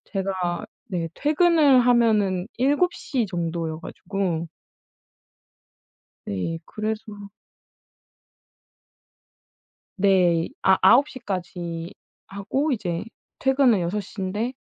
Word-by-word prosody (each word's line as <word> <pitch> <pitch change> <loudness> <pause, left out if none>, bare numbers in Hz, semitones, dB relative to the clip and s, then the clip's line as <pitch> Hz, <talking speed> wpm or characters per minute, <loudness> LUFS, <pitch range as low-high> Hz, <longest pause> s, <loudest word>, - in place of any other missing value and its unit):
제가 190 0 -2 0.2
네 170 -3 -3
퇴근을 300 -3 +4
하면은 215 -5 +3
7 290 +7 +2
시 260 -6 -2
정도여 165 -2 -3
가지고 175 -3 -3 1.8
네. 100 - -3
그래서 215 0 -4 2.9
네. 180 -4 +3
이 - - -14
아 190 0 +5
9 250 +9 +6
시까지 175 - -5 0.3
하고 265 +10 -2
이제 180 -7 -2 0.3
퇴근은 265 -6 +3
6 175 +5 -1
시인데 205 +4 -4
195 Hz, 145 characters per minute, -24 LUFS, 175-245 Hz, 2.9 s, 9